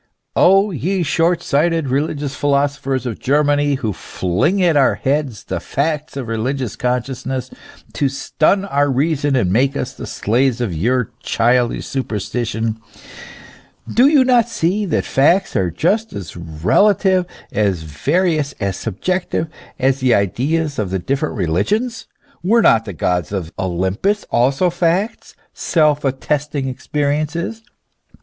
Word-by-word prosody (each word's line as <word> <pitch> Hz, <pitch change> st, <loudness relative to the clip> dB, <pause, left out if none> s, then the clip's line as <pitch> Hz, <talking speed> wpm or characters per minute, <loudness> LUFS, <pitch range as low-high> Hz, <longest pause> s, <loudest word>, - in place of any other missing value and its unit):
O 195 Hz, +3 st, +5 dB
ye 180 Hz, +4 st, -1 dB
short 170 Hz, +3 st, +1 dB
sighted 160 Hz, +1 st, +1 dB
religious 145 Hz, +1 st, -1 dB
philosophers 140 Hz, -2 st, 0 dB
of 120 Hz, -3 st, -4 dB
Germany, 145 Hz, +1 st, +2 dB
who 115 Hz, -6 st, -2 dB
fling 105 Hz, -, -1 dB
at 170 Hz, -3 st, +3 dB
our 140 Hz, -2 st, +4 dB
heads 135 Hz, -5 st, -1 dB
the 95 Hz, -, -3 dB
facts 150 Hz, -, -2 dB
of 135 Hz, -, -3 dB
the 115 Hz, -, -6 dB
religious 120 Hz, 0 st, -2 dB
consciousness, 125 Hz, +1 st, -3 dB, 0.4 s
to 140 Hz, -, +1 dB
stun 160 Hz, +8 st, +1 dB
our 145 Hz, -6 st, +1 dB
reason 145 Hz, +1 st, +1 dB
and 95 Hz, -8 st, +1 dB
make 135 Hz, +5 st, +2 dB
us 125 Hz, -, -3 dB
the -, -, -8 dB
slaves 125 Hz, +3 st, 0 dB
of 115 Hz, -7 st, -2 dB
your 120 Hz, +8 st, 0 dB
childish 120 Hz, +1 st, +1 dB
superstition, 115 Hz, -2 st, -3 dB, 1.1 s
do 250 Hz, +3 st, +6 dB
you 285 Hz, -3 st, +5 dB
not 240 Hz, -2 st, +3 dB
see 205 Hz, 0 st, 0 dB
that 165 Hz, -, 0 dB
facts 160 Hz, +7 st, +2 dB
are 95 Hz, -5 st, +1 dB
just 195 Hz, -, 0 dB
as 95 Hz, -4 st, -7 dB
relative, 180 Hz, -, +2 dB, 0.2 s
as 100 Hz, -6 st, 0 dB
various, 145 Hz, -, 0 dB
as 100 Hz, -2 st, -3 dB
subjective, 165 Hz, -, -2 dB, 0.3 s
as 135 Hz, +1 st, +1 dB
the 130 Hz, -2 st, +3 dB
ideas 145 Hz, -, 0 dB
of 100 Hz, -3 st, -1 dB
the 95 Hz, -, -1 dB
different 135 Hz, -, -2 dB
religions? 125 Hz, -, -1 dB, 0.3 s
Were 225 Hz, +6 st, +3 dB
not 115 Hz, 0 st, +4 dB
the 100 Hz, -, -6 dB
Gods 90 Hz, +1 st, -1 dB
of 90 Hz, -5 st, -4 dB
Olympus 95 Hz, -, -1 dB
also 135 Hz, +9 st, +2 dB
facts, 175 Hz, +5 st, -1 dB, 0.2 s
self 150 Hz, -3 st, +1 dB
attesting 140 Hz, +1 st, -1 dB
existences 150 Hz, -, -2 dB
140 Hz, 135 wpm, -18 LUFS, 115-165 Hz, 1.1 s, do